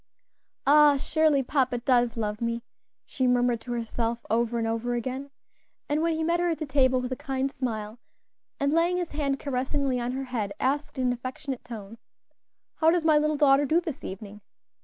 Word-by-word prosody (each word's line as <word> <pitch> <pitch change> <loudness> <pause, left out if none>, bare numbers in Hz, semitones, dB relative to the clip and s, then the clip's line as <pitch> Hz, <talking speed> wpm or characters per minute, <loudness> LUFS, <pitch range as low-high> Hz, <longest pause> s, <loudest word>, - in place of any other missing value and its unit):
"Ah! 295 0 +6
surely 305 -1 +2
papa 255 -2 +1
does 240 -1 +2
love 210 -1 -2
me," 235 0 -2 0.4
she 260 -2 -1
murmured 245 -2 +2
to 245 - -7
herself 230 0 -3
over 235 +1 +1
and 225 -1 0
over 230 +2 -1
again; 260 +4 -4 0.6
and 295 +1 0
when 335 0 +1
he 320 - -1
met 340 +2 +1
her 350 0 +1
at 325 - -1
the 310 - -4
table 260 -2 +3
with 250 0 -4
a - - 0
kind 270 -1 -2
smile, 220 -4 -4 0.6
and 280 +1 +1
laying 340 +2 +2
his 355 -2 -3
hand 280 -2 -1
caressingly 270 -1 -1
on 245 +1 -2
her 270 +1 -3
head, 225 -6 -3
asked 285 +2 -1
in 260 - 0
an 250 - +2
affectionate 255 +2 -6
tone, 225 -1 -9 0.8
"How 320 - +4
does 340 0 +2
my 310 -2 +5
little 305 0 +1
daughter 285 -1 +4
do 320 +5 +3
this 320 -6 -6
evening?" 200 +2 -8
260 Hz, 190 wpm, -27 LUFS, 235-295 Hz, 0.8 s, Ah